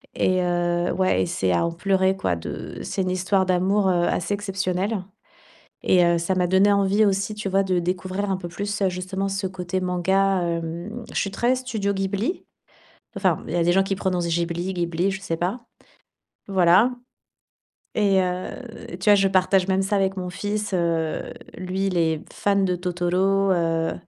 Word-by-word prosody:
Et 185 0 +2
heu, 175 0 0
ouais, 185 - +2
et - - -1
c'est 95 -1 0
à 90 - +2
en - - -2
pleurer 190 +2 +1
quoi, 90 - 0
de. 85 - -7
C'est 190 - -2
une 185 - -1
histoire 185 +1 +1
d'amour, 190 +2 +2
heu, 175 -1 +2
assez 180 +4 -1
exceptionnelle. 195 0 -2 0.8
Et 180 -1 +4
heu, 170 0 +3
ça 170 +3 -1
m'a 180 -1 +1
donné 190 +3 +4
envie 200 +1 +3
aussi, 195 +1 0
tu 210 -1 -4
vois, 195 +1 +2
de 185 -2 +1
découvrir 185 +3 -2
un 190 - +1
peu 175 - -6
plus, 205 +3 -4
heu, 190 - +3
justement 185 +2 -3
ce 195 0 -2
côté 185 0 -3
manga, 190 +1 +1
hem. 170 +7 -4
Je - - -3
suis 195 - -1
très 245 +4 +1
studio 225 -6 -2
Ghibli. 200 - -2 0.7
Enfin, 185 -5 +1
il 175 - -2
y 170 - +3
des 175 - +3
gens 190 +2 +4
qui 195 0 -2
prononcent 180 -3 -1
Ghibli, 170 +2 -1
Ghibli, 175 +1 0
je 190 0 -4
sais 165 -4 -3
pas. 180 +8 -2 0.9
Voilà. 190 +5 +5 1.1
Et 200 -3 +3
heu, 180 0 -2 0.5
tu 200 +3 +1
vois, 205 - +8
je 195 -1 +3
partage 185 0 +3
même 190 0 +2
ça 195 +2 0
avec 195 0 0
mon 180 -1 -3
fils, 205 +2 -3
heu. 165 -3 0 0.4
Lui, 185 +2 -2
il 180 - -1
est 160 -2 +1
fan 200 -1 +1
de 180 - 0
Totoro 180 +2 +1
heu, 165 -2 +1
185 Hz, 185 wpm, -23 LUFS, 175-195 Hz, 1.1 s, vois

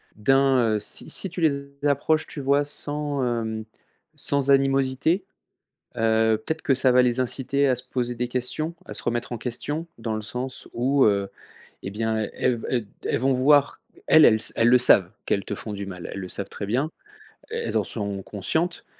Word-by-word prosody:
d'un, 130 0 +2
heu, - - -1
si 105 - -7
si 190 - -3
tu 180 - -6
les 140 -3 0 0.2
approches, 155 +2 0
tu - - -8
vois? 140 +2 +1
Sans, 145 -1 -3
hem, 110 -2 -3 0.5
sans 140 -2 +4
animosité, 135 +6 +1 0.7
heu, 110 -1 +2
peut-être 160 0 -3
que 135 - +2
ça 130 0 +2
va 125 - +5
les 125 0 0
inciter 135 +2 0
à 130 - +1
se 125 - -1
poser 125 -1 -3
des 120 +1 -3
questions, 130 +7 -3
à - - -9
se - - -1
remettre 120 +1 -3
en 120 - -4
question. 145 +8 -4
Dans 110 -2 -4
le 110 - -5
sens 125 +4 -4
où, 130 +3 +2
heu, 100 -2 +1 0.5
et 95 - -6
bien, 110 +1 -2
heu, - - -7
elles 125 -1 +1
ve 115 - -8
elles 120 -3 -1
d - - -24 0.2
elles - - 0
vont 135 +1 +1
voir 140 +2 +2 0.3
elles 155 - +6
elles 110 - +5
s 110 - +9
elles 115 - +2
le 125 - +6
savent 95 -7 +7
qu'elles 100 - -2
te - - -4
font 105 - -7
du 100 -1 -6
mal, 90 -2 -8
elles 100 - -6
le 95 - -7
savent 100 - -4
très 100 - -6
bien, 130 +9 -1 0.6
el 460 +1 -4
elles - - -2
en - - -1
sont 100 -3 -3
conscientes 160 - -3
125 Hz, 210 wpm, -23 LUFS, 110-140 Hz, 0.7 s, s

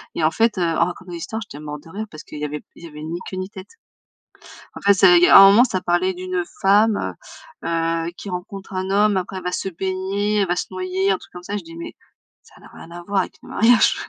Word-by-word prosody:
Et 165 - -1
en 155 - +3
fait, 225 +4 +1
heu, 180 - +1
en 165 0 +2
racontant 180 +1 -7
des 170 - -5
histoires, 220 +6 -5
j'étais 145 -7 -11
morte 150 -1 -7
de 165 - -15
rire 215 +4 -5
parce 155 -1 -11
qu'il 150 - -10
y 150 - -2
avait 150 0 -6
il - - -15
y 170 - -7
avait 150 0 -10
ni 165 +2 -4
queue 185 - -6
ni 185 +1 -4
tête. 190 -2 -11 1.1
En - - -7
fait, 200 0 +5
c'est 185 -2 +6
il 175 - +4
y - - +7
a - - +9
un 195 0 +10
moment, 235 +6 +6
ça 185 -6 -2
parlait 180 +1 +1
d'une 185 0 -3 0.2
femme, 205 +2 +3 0.5
heu, - - -4
heu, 165 0 -1
qui 200 - -8
rencontre 190 +2 -7
un 185 0 -3
homme, 205 0 +3
après 185 +1 -4
elle - - -13
va 180 - -2
se 185 - -3
baigner, 190 +3 -2
elle 200 - +2
va 175 - 0
se - - -3
noyer, 185 +1 -1
un 190 - +1
truc - - -18
comme 180 0 -10
ça, 205 +2 -4
je 200 - -7
dis: 165 0 -12
«Mais 170 - -7 0.5
ça - - -20
n'a - - -15
rien - - -12
à 175 0 -9
voir 200 +2 0
avec - - -7
mon - - -13
mariage». 230 +1 +4
185 Hz, 275 wpm, -21 LUFS, 170-195 Hz, 1.1 s, un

